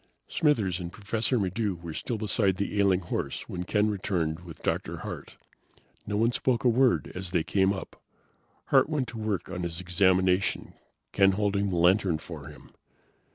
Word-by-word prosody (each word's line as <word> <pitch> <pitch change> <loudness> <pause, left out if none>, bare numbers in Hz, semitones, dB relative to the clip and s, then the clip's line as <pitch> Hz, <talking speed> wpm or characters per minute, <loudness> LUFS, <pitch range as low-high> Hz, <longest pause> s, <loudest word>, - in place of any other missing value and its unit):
Smithers 105 - +1
and 85 -1 -5
Professor 110 +5 0
Maddox 100 -2 -1
were 85 -2 -6
still 115 - -3
beside 100 -2 +1
the 100 +1 -2
ailing 95 -2 +3
horse 85 - -4
when 90 0 -5
Ken 105 +2 +2
returned 90 -6 -1
with 85 -2 -12
Dr. - - -1
Hart. - - -7 0.7
No 105 0 -1
one 115 +2 +3
spoke 120 0 0
a 125 - +5
word 125 +1 +2
as 90 0 -4
they 85 -3 +1
came 95 +2 +2
up. 95 - -7 0.7
Hart - - +5
went 145 -5 -1
to 115 - -7
work 105 -4 -2
on 90 -1 -4
his 85 -1 -3
examination, 95 +1 +2 0.4
Ken 95 -1 +4
holding 100 0 0
the 90 - -2
lantern 90 0 +3
for 80 -3 -9
him. 75 - -13
95 Hz, 170 wpm, -28 LUFS, 90-105 Hz, 0.7 s, a